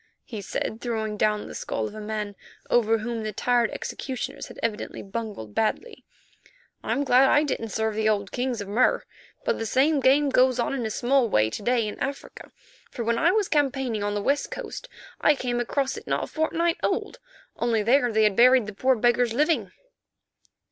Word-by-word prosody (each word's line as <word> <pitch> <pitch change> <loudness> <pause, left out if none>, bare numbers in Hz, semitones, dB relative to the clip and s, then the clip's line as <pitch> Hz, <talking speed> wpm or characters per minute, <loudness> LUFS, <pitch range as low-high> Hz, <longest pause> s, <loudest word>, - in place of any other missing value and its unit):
he 220 -4 -6
said, 215 +3 -4
throwing 220 -3 -2
down 210 0 0
the - - -9
skull 110 - -3
of - - -10
a 215 - -7
man 210 -1 -4 0.4
over 225 -2 +3
whom 230 +1 -4
the 215 0 -3
tired 240 +2 +1
executioners 260 -4 -5
had - - -12
evidently 220 -2 -3
bungled 200 - -6
badly, 425 - -2 0.8
"I'm 285 - 0
glad 265 0 +5
I 295 - +4
didn't 230 -6 -3
serve 220 +1 -1
the 215 0 +1
old 200 -2 -1
kings 245 -3 -2
of 200 - -6
Mur. 225 +6 +2 0.4
But - - 0
the 225 - -2
same 285 +6 +3
game 275 +2 +4
goes 255 -1 +3
on 245 - 0
in 245 -5 -2
a - - -4
small 245 +2 +2
way 110 - +2
to - - -5
day 235 0 +1
in 210 - -7
Africa, 280 +1 -6 0.4
for 240 - -5
when 230 0 0
I 335 - +4
was 415 0 +1
campaigning 265 -7 0
on 205 0 -1
the 205 - -2
West 280 +4 0
Coast - - -7 0.3
I 300 - +5
came 245 -2 -2
across 265 +3 -1
it - - -10
not - - 0
a - - -2
fortnight 330 +2 0
old, - - -2 0.4
only 230 -3 +1
there 245 +2 +3
they 220 0 +3
had 210 -2 +3
buried 250 +1 +6
the 210 - -7
poor 260 +6 +2
beggars 240 0 +2
living." 275 - +1
235 Hz, 195 wpm, -25 LUFS, 215-265 Hz, 0.8 s, buried